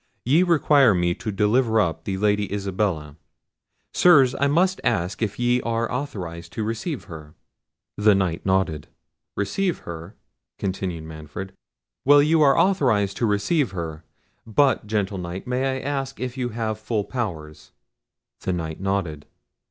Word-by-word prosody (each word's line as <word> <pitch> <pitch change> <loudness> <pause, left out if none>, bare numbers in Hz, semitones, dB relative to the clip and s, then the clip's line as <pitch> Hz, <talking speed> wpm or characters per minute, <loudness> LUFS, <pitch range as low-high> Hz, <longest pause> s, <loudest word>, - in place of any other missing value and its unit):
Ye 145 +8 +4
require 145 - +4
me 85 0 +1
to 110 +3 -5
deliver 110 +3 +2
up 80 -4 -1
the 95 -1 -2
Lady 105 0 +1
Isabella. 95 -7 -2 0.8
Sirs, 140 -8 +6
I 140 - +3
must 180 +6 +2
ask 90 +5 -1
if 105 -2 -1
ye 120 0 +2
are 115 0 -1
authorised 90 -11 -5
to 110 - -2
receive 115 +7 -3
her?" 80 -4 -11 0.6
The 105 -1 +5
Knight 90 -4 -1
nodded. 95 -6 0 0.5
"Receive 180 - -1
her," 85 +3 -8 0.4
continued 95 -4 -3
Manfred; 80 +4 -8 0.5
"well, 145 +1 +6
you 155 +1 +3
are 140 -2 +5
authorised 125 - +2
to 115 - +1
receive 105 - +1
her, 80 -3 -5 0.4
but, 115 0 +2
gentle 105 -2 -1
Knight, 90 +2 -6
may 130 +1 -1
I - - -6
ask 135 -1 -3
if 125 -1 -4
you 125 -2 -2
have 110 -1 -3
full 110 -1 -1
powers?" 90 -10 -5 0.7
The 95 - -2
Knight 80 -2 -4
nodded. 95 -6 -2
105 Hz, 145 wpm, -23 LUFS, 90-130 Hz, 0.8 s, Sirs